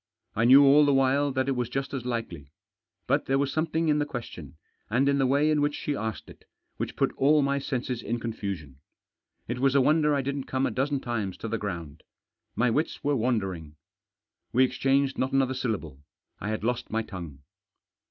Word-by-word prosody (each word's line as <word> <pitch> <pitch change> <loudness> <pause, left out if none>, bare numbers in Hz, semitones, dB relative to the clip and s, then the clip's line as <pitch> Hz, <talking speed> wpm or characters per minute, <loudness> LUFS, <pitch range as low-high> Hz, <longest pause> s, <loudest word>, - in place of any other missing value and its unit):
I 110 - +2
knew 135 +4 +8
all 145 +2 +7
the 145 -1 +3
while 135 +2 +2
that 130 0 0
it - - +1
was 125 -3 -1
just 135 +2 -3
as 125 -3 -4
likely. 90 - -4 0.5
But - - +1
there 135 - +2
was 140 -1 0
something 160 +1 0
in 150 -1 +3
the 145 - +1
ques 125 -5 -5
tion, 75 -2 -11 0.3
and 125 +6 +2
in 140 0 +2
the 135 - +3
way 145 +4 +3
in 150 -1 +2
which 145 0 +1
she 145 - -3
asked 110 -4 -4
it, - - -15 0.3
which - - -4
put - - 0
all 145 +2 +4
my 140 0 +1
senses 130 -3 -3
in 120 +2 -3
confusion. 100 - -5 0.7
It 120 +2 -3
was 135 +1 +2
a - - +6
wonder 150 +1 +3
I 140 - 0
didn't 140 0 -3
come 130 +1 -1
a - - -1
dozen 135 +3 -1
times 110 -6 -3
to - - -6
the 115 0 -2
ground. 85 -7 -6 0.5
My 120 0 +2
wits 150 +8 -1
were 145 0 +1
wandering. 95 - -2 0.8
We 130 - +4
exchanged 135 +1 +1
not 130 +1 -1
another 135 -1 +2
syllable. 105 - -3 0.4
I 105 - -4
had 110 -1 -3
lost 120 +1 -2
my 115 +1 -1
tongue. 85 -10 -9
130 Hz, 205 wpm, -27 LUFS, 110-140 Hz, 0.8 s, knew